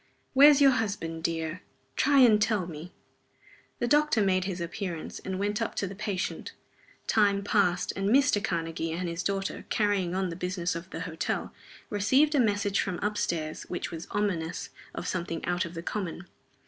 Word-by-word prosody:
"Where's 285 +1 +8
your 275 -1 +8
husband, 195 -9 -2
dear? 165 +1 -2 0.3
Try 280 0 +4
and 220 -4 +6
tell 215 -4 +2
me." 165 +1 -8 0.9
The - - -1
doctor 295 -2 +3
made 185 -2 +2
his 185 -2 -3
appearance, 170 0 -5
and 190 0 -4
went 205 +3 -1
up 225 - -2
to - - -1
the 195 - -6
patient. 200 -2 -3 0.5
Time 200 -2 +3
passed, 195 -4 +1
and 195 +1 0
Mr. 260 -4 +4
Karnegie 165 -3 -2
and 180 +2 -3
his 170 +1 -3
daughter, 195 +1 -2
carrying 200 -4 +1
on 190 -1 0
the 165 - -5
business 180 0 -2
of 170 +2 -7
the - - -6
hotel, 165 -2 -3 0.4
received 260 +9 +3
a 290 - +3
message 205 -3 +2
from 185 -2 -1
up 210 0 0
stairs 155 -6 -3
which 180 - -4
was 165 +1 -7
ominous 180 -6 -2 0.2
of - - -4
something 170 -2 -3
out 180 0 0
of 170 +1 -8
the 165 - -5
common. 180 -2 -4
190 Hz, 175 wpm, -28 LUFS, 170-210 Hz, 0.9 s, Where's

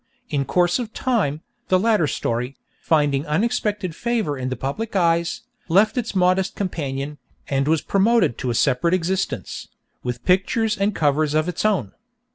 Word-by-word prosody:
In 140 -2 0
course 175 - +2
of 230 -2 -5
time, 200 - 0 0.3
the 185 - +4
latter 210 -5 +2
story, 125 0 -2 0.3
finding 145 -3 +2
unexpected 205 0 -1
favour 225 -11 -1
in 130 -1 -3
the 130 - -2
public 145 - -4
eyes, 170 -2 +1 0.3
left 200 +6 +4
its 235 -5 -2
modest 185 +1 +2
companion, 145 -6 -3 0.3
and 135 0 +1
was 160 0 +2
promoted 205 - +3
to 130 - -2
a 120 - -1
separate 140 +8 +2
existence, 185 +2 -2 0.3
with 125 -1 -5
pictures 210 +4 +2
and 200 +1 0
covers 150 0 +1
of 155 +2 +2
its 180 - -2
own. 190 - +1
170 Hz, 155 wpm, -22 LUFS, 140-205 Hz, 0.3 s, the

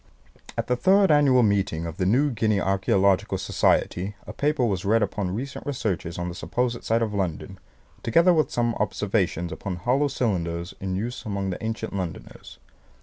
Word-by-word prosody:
"At - - -1
the 125 - +1
third 190 +5 +4
annual 140 -4 +5
meeting 100 -6 +1
of 80 -1 -6
the 90 - 0
New 135 +8 +3
Guinea 110 -3 +1
Archaeological 95 0 +2
Society 95 +3 0
a 105 - -8
paper 145 0 +1
was 95 -5 -1
read 110 +2 +3
upon 100 -4 -2
recent 135 +5 -5
researches 105 - -3
on 90 0 -3
the 90 - -4
supposed 120 +6 -2
site 115 +1 +1
of 110 -2 -3
London, 95 0 -3 0.4
together 170 +10 +4
with 155 -2 +2
some 120 -1 0
observations 95 -4 -1
upon 95 -2 -4
hollow 125 +11 +1
cylinders 85 -10 -2
in 95 -1 -3
use 120 +6 -4
among 100 -2 -2
the 90 - -6
ancient 110 0 -3
Londoners. 90 -4 -6
105 Hz, 170 wpm, -25 LUFS, 95-125 Hz, 0.4 s, annual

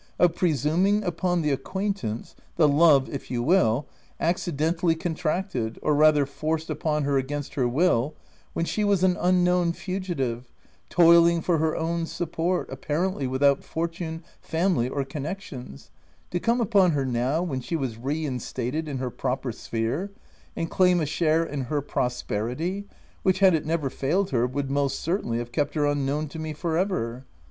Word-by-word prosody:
— - - -38
of 175 -2 +5
pre 175 -1 +1
suming 180 - +1
upon 175 0 0
the 150 - +1
acquaintance 190 - -3
— - - -33
the 160 -3 +5
love 145 -2 +5
if 140 - -7
you 120 -2 -1
will 135 -5 +3 0.2
— - - -34
accidentally 165 0 0
contracted, 160 - -2
or 150 - +2
rather 150 -1 +5
forced 155 +3 -3
upon 150 0 -1
her 140 -1 +2
against 145 +2 -4
her 130 -5 +1
will, 145 0 +2 0.4
when 165 - -1
she 210 - -1
was 200 -3 +2
an 185 -1 +4
unknown 180 -1 +3
fugitive, 170 -11 -3 0.4
toiling 170 0 +6
for 165 0 +1
her 160 0 +1
own 165 0 -1
support, 170 +2 -1
apparently 150 +3 -1
without 140 +2 +2
fortune, 165 0 -4 0.2
family 165 -7 +1
or 140 0 -2
connec 150 +7 -4
tions 125 - -10 0.2
— - - -36
to 175 - 0
come 235 +5 +1
upon 200 -7 +4
her 140 -2 0
now, 130 +6 0
when 135 -7 -3
she 165 - -3
was 130 -7 -2
re 145 +7 -2
instated 130 +3 -3
in 140 -3 -3
her 125 -1 -3
proper 130 0 -2
sphere, 120 - -3 0.4
and 165 - -3
claim 180 -1 +4
a 160 - 0
share 160 +2 +2
in 145 -5 -4
her 145 +4 -1
prosperity, 130 - -2 0.3
which, 190 -1 +2
had 190 -2 +5
it 155 -2 0
never 160 -3 0
failed 165 +9 0
her, 125 -2 +2
would 135 +1 -3
most 140 -1 0
certainly 165 - -1
have 120 0 -5
kept 145 +3 -1
her 150 -1 +2
unknown 145 +1 0
to 155 +3 -8
me 155 -1 -4
for 160 +2 -2
ever 150 - -1
155 Hz, 175 wpm, -25 LUFS, 135-175 Hz, 0.4 s, toiling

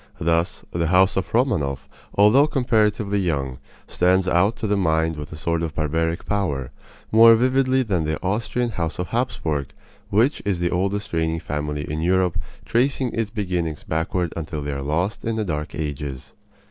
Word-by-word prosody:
Thus, 85 +2 0
the 85 -1 0
house 95 +3 +4
of 95 - -2
Romanoff, 75 - 0 0.3
although 110 +9 +6
comparatively 110 -6 +1
young, 70 -8 -2 0.3
stands 95 +1 +2
out 95 +5 +3
to 115 - -5
the 105 -1 +1
mind 80 -3 +1
with 75 -1 -7
a - - -7
sort 85 +2 -1
of 80 -3 -3
barbaric 80 +2 -1
power, 80 -11 -1 0.4
more 115 +1 +8
vividly 130 +2 +2
than 95 -8 0
the 75 0 -2
Austrian 115 +5 -1
house 85 -5 -3
of 90 -2 -3
Hapsburg, 80 - -1 0.4
which 115 +9 +2
is 100 -3 0
the 85 0 0
oldest 100 +2 -1
reigning 80 0 0
family 75 -2 -3
in 75 +1 -3
Europe, 90 0 +2 0.3
tracing 130 +1 +1
its 115 -2 -1
beginnings 90 -8 -3
backward 80 +1 -1
until 75 -2 -4
they 75 - -3
are 70 -1 -4
lost 85 +9 -1
in 115 0 -1
the 110 -1 -1
Dark 75 -4 -4
Ages. 70 -4 -5
90 Hz, 170 wpm, -23 LUFS, 80-105 Hz, 0.4 s, more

